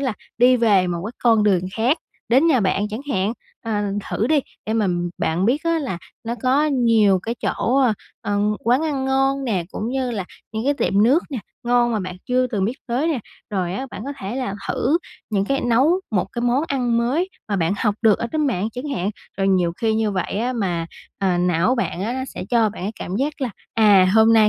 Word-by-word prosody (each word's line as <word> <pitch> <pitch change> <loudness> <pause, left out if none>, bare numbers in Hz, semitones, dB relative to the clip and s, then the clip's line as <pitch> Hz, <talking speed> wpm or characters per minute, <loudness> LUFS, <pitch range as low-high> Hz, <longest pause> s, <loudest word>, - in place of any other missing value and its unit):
là 260 -4 0 0.3
đi 250 +1 +6
về 205 -6 +4
một 170 -1 -2
cái 220 - -5
con 225 -3 +5
đường 195 -4 +3
khác, 250 +8 +2 0.3
đến 265 +7 +4
nhà 280 -7 +4
bạn 200 +1 +1
chẳng 215 +3 -4
hạn. 200 -3 +1 0.3
Ờ, 215 -2 -1 0.3
thử 220 - 0
đi, 300 +2 +3 0.3
để 220 - -1
mà 220 -2 +2 0.3
bạn 170 +4 0
biết 255 +8 +2
á 335 0 +2
là 260 - -3 0.3
nó 230 +1 -2
có 265 +4 +3
nhiều 230 -8 +4
cái 230 +3 -3
chỗ, 250 - 0
ơ, 260 -4 +4 0.3
ờ, 205 0 -1 0.3
quán 245 +6 +3
ăn 285 -4 -1
ngon 270 +1 +1
nè, 195 -8 0
cũng 215 - -4
như 260 0 -1
là 205 -5 -3 0.3
những 220 +1 -3
cái 285 +2 +2
tiệm 200 -7 +2
nước 270 +10 +4
nè 270 - -3 0.3
ngon 240 0 +3
mà 220 - 0
bạn 185 -1 -5
chưa 255 0 +2
từng 210 -6 -1
biết 220 - 0
tới 255 +6 0
nè. 310 -5 0 0.3
Rồi 185 -4 -1
á, 265 +6 -3
bạn 210 - -7
có 280 - -4
thể 195 +6 -4
là 250 -6 -2
thử 300 +7 +1 0.3
những 200 -2 +1
cái 275 +6 0
nấu 265 +10 +3
một 200 -5 +1
cái 240 - -3
món 245 +3 +2
ăn 245 -4 +1
mới 265 +11 +1 0.2
mà 200 - 0
bạn 165 0 +1
học 210 -3 +1
được 220 -3 +5
ở - - -2
trên 310 -1 +1
mạng 215 -5 0
chẳng 255 +4 -5
hạn. 190 +1 -1 0.3
Rồi 195 0 +2
nhiều 180 -3 +2
khi 225 -2 +2
như 220 -1 +1
vậy 185 -3 -2
á 245 +3 0
mà, 180 -8 -1 0.3
à, 185 -3 +1
não 180 +6 +2
bạn 235 -7 -2
á 225 +4 -1
nó 260 +1 -3
sẽ - - -5
cho 230 -3 +4
bạn 210 - -8
cái 200 +3 -2
cảm 185 - -3
giác 290 +5 -2
là, 260 -3 -1 0.2
à, 205 -4 +6
hôm 220 0 +6
nay 220 -2 +6
230 Hz, 235 wpm, -21 LUFS, 200-260 Hz, 0.3 s, đi